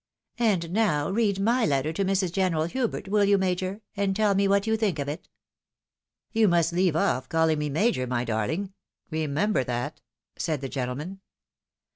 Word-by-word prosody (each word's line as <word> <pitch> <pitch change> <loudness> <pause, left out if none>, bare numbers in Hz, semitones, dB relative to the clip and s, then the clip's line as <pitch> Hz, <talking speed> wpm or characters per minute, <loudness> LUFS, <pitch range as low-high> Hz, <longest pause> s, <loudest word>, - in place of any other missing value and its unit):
" - - -62
And 190 -8 +1
now 185 -7 +1
read 200 -2 +1
my 235 +5 +2
letter 145 -2 +1
to 195 - -1
Mrs. 190 -2 +1
General 180 -4 +1
Hubert, 230 +5 -2
will 205 +1 +2
you. 200 0 +4
Major, 185 +2 -1
and 195 -1 0
tell 210 -1 +3
me 195 0 +2
what 200 +1 +2
you 220 0 +2
think 215 -6 0
of 140 -1 -3
it." 150 +5 -6 0.5
" - - -62
You 225 -2 +3
must 170 -2 +2
leave 180 -2 +2
off 130 -5 0
calling 160 -1 +2
me 150 0 -1
Major, 150 - +1
my 125 0 -1
darhng, 140 - -2 0.2
— - - -46
re 155 0 -1
member 155 +3 +1
that," 120 0 -4 0.4
said 155 -4 -1
the 135 - -4
gentleman. 140 +9 -4
180 Hz, 190 wpm, -26 LUFS, 150-200 Hz, 0.5 s, you